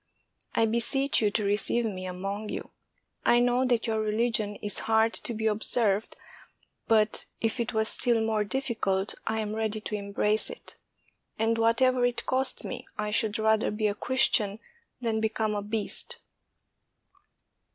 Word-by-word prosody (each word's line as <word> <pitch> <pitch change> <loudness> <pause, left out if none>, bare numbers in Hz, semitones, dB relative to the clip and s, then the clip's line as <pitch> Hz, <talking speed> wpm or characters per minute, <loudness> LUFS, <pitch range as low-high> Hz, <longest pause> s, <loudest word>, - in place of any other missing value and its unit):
I 225 - +4
beseech 235 +5 +1
you 210 - +3
to 210 +1 0
receive 210 +4 +1
me 185 -4 -4
among 195 +4 -4
you. - - -5 0.5
I 240 - +5
know 245 +1 +2
that 240 -3 +1
your 220 -2 0
religion 215 -1 0
is 205 0 -3
hard 225 0 +4
to - - -3
be 220 +1 -3
observed, 215 -1 0 0.7
but 215 -1 +2
if 225 +2 -1
it 235 +1 -1
was 220 0 +2
still 240 -2 +2
more 220 -1 +1
difficult, 210 -5 -1
I 220 0 0
am 210 0 -3
ready 220 -1 -1
to 215 - -6
embrace 210 +1 +1
it; - - -8 0.6
and 225 +1 +2
whatever 245 +2 +3
it 245 0 0
cost 260 +1 -1
me, - - -6
I 210 0 -2
should 215 0 +1
rather 220 0 +2
be 210 +1 -2
a 205 - +2
Christian 220 -4 +2 0.4
than 225 -2 0
become 220 -1 0
a 205 - -1
beast." 210 0 -2
220 Hz, 155 wpm, -28 LUFS, 210-235 Hz, 0.7 s, I